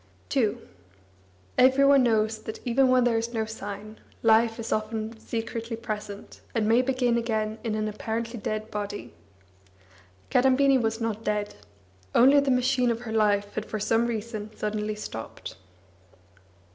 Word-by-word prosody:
II 230 -6 +2 1.0
Every 265 +2 +6
one 275 -1 +6
knows 220 -2 +2
that, 220 - -7
even 255 +2 +3
when 255 -1 +4
there 235 -2 +2
is 230 +1 -4
no 220 -1 0
sign, 215 0 -8 0.2
life 225 0 +4
is 230 - -5
often 220 +1 -2
secretly 230 0 -4
present, 210 -3 -7
and 220 -2 +1
may 230 +3 +5
begin 250 -2 +1
again 220 -2 -2
in 225 -2 -1
an 215 0 -1
apparently 230 +2 -4
dead 215 +1 -4
body. 205 0 -5 1.2
Kadambini 265 +1 +4
was 225 0 -1
not 225 -1 -2
dead; 210 -1 -1 0.6
only 270 +4 +7
the 280 -1 0
machine 250 0 +2
of 230 0 -1
her 225 -2 -6
life 205 -2 +2
had 215 - -4
for 215 - -4
some 225 +3 +2
reason 220 -2 -4
suddenly 210 0 -2
stopped. 115 - -7
225 Hz, 145 wpm, -26 LUFS, 215-240 Hz, 1.2 s, only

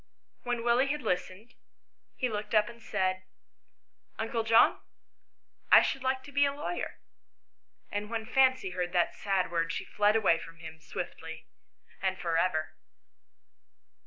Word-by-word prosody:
When 245 -1 -2
Willie 240 +3 +3
had 295 +2 -2
listened, 185 +5 -3 0.6
he 255 - 0
looked 210 -1 -3
up 210 0 +5
and 235 -1 -11
said, 185 -3 -1 0.5
" - - -46
Uncle 225 +1 -1
John, 225 +1 +5 0.9
I - - +9
should 270 - -1
like 260 0 -1
to 285 - -12
be 285 +1 +3
a 280 - +3
lawyer." 295 +5 -4 0.9
And 205 +1 -3
when 225 -1 -3
Fancy 260 -4 +3
heard 180 0 -3
that 175 -2 +2
sad 195 -3 -1
word 165 -1 0
she - - -4
fled 210 +1 +2
away 190 -7 +3
from 165 0 -11
him 160 -1 -10
swiftly 160 0 -7 0.6
and 190 -1 0
for 170 -3 -2
ever. 165 -2 0
210 Hz, 150 wpm, -30 LUFS, 175-240 Hz, 0.9 s, I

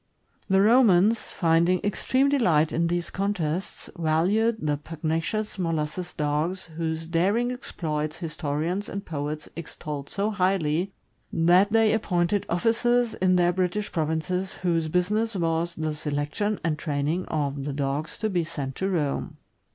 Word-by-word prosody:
The 190 0 +5
Romans, 220 -2 +5
finding 170 +1 +2
extreme 260 +6 +1
delight 175 - +3
in 170 +1 +1
these 175 0 -2
contests, 190 -3 -2
valued 185 +8 +2
the 150 -1 0
pugnacious 165 +7 -3
Molossus 165 +1 -2
Dogs, 155 +5 -1
whose 160 0 -2
daring 195 +9 +1
exploits 155 -10 -3
historians 165 +3 -2
and 200 0 -5
poets 150 0 -4
extolled 150 -3 -6
so 205 +2 -1
highly 185 -3 +1 0.4
that 180 +5 +4
they 225 -1 +4
appointed 185 -2 0
officers 230 +6 +2
in 185 0 +2
their 175 0 +3
British 185 +3 -1
provinces 165 +4 -1
whose 165 -3 +1
business 210 +7 0
was 170 -1 0
the 155 -1 -2
selection 150 +8 -2
and 155 -2 0
training 150 +4 -1
of 140 -2 -2
the 145 - -3
dogs 140 +2 -2
to 220 - -1
be 175 -2 +1
sent 145 -5 -5
to 190 - -1
Rome. 150 -7 -1
170 Hz, 135 wpm, -26 LUFS, 155-195 Hz, 0.4 s, The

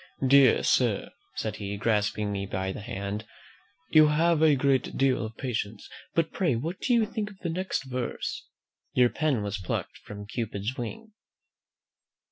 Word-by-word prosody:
"Dear 135 -2 +6
sir," - - +2 0.2
said 110 -1 -3
he, 100 0 -4
grasping 105 -1 0
me 100 -1 -3
by 95 0 -2
the 100 - -6
hand, 100 +1 -4 0.7
"you 155 -1 +7
have 160 +1 +3
a 155 -2 +6
great 135 -1 +1
deal 135 -3 +2
of 110 0 -7
patience; 110 -5 -3 0.3
but 165 -1 +2
pray 175 -10 +1
what 160 +10 -3
do 245 - +2
you 230 -2 +4
think 215 -1 -3
of 200 - -14
the 170 - -1
next 185 -2 -2
verse? 130 -2 -4 0.5
"'Your 125 -1 +5
pen 145 -8 0
was 100 0 -3
plucked 90 - -4
from 105 0 -9
Cupid's 110 +1 -3
wing.'" 215 - -6
125 Hz, 160 wpm, -28 LUFS, 105-155 Hz, 0.7 s, you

